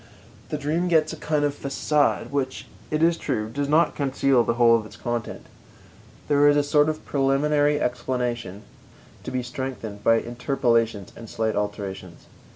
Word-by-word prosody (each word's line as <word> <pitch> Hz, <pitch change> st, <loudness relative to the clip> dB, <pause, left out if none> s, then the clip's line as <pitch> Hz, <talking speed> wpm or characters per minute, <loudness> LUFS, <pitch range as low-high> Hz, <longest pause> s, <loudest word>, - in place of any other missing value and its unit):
The 150 Hz, -, -2 dB
dream 155 Hz, +5 st, -1 dB
gets 160 Hz, -2 st, +2 dB
a -, -, -5 dB
kind 150 Hz, -1 st, 0 dB
of 145 Hz, -, 0 dB
façade 145 Hz, +1 st, 0 dB
which, 135 Hz, -2 st, -2 dB, 0.2 s
it 155 Hz, +1 st, 0 dB
is 170 Hz, 0 st, +3 dB
true, 110 Hz, -6 st, -2 dB
does 140 Hz, +2 st, -2 dB
not 160 Hz, +3 st, +3 dB
conceal 135 Hz, -2 st, +2 dB
the 115 Hz, -, -1 dB
whole 120 Hz, -1 st, +5 dB
of 115 Hz, -, 0 dB
its 110 Hz, -, -13 dB
content. 120 Hz, -1 st, -4 dB, 0.8 s
There 145 Hz, 0 st, +4 dB
is 145 Hz, 0 st, +5 dB
a 145 Hz, -, +3 dB
sort 145 Hz, +1 st, +3 dB
of 155 Hz, 0 st, -5 dB
preliminary 145 Hz, +2 st, +2 dB
explanation 120 Hz, -6 st, -3 dB, 0.6 s
to -, -, -5 dB
be 130 Hz, -1 st, -2 dB
strengthened 120 Hz, -5 st, -6 dB
by 115 Hz, -, +5 dB
interpolations 115 Hz, -4 st, -1 dB
and 115 Hz, -2 st, -10 dB
slight 110 Hz, -2 st, -1 dB
alterations. 100 Hz, -4 st, -5 dB
135 Hz, 160 wpm, -24 LUFS, 115-145 Hz, 0.8 s, whole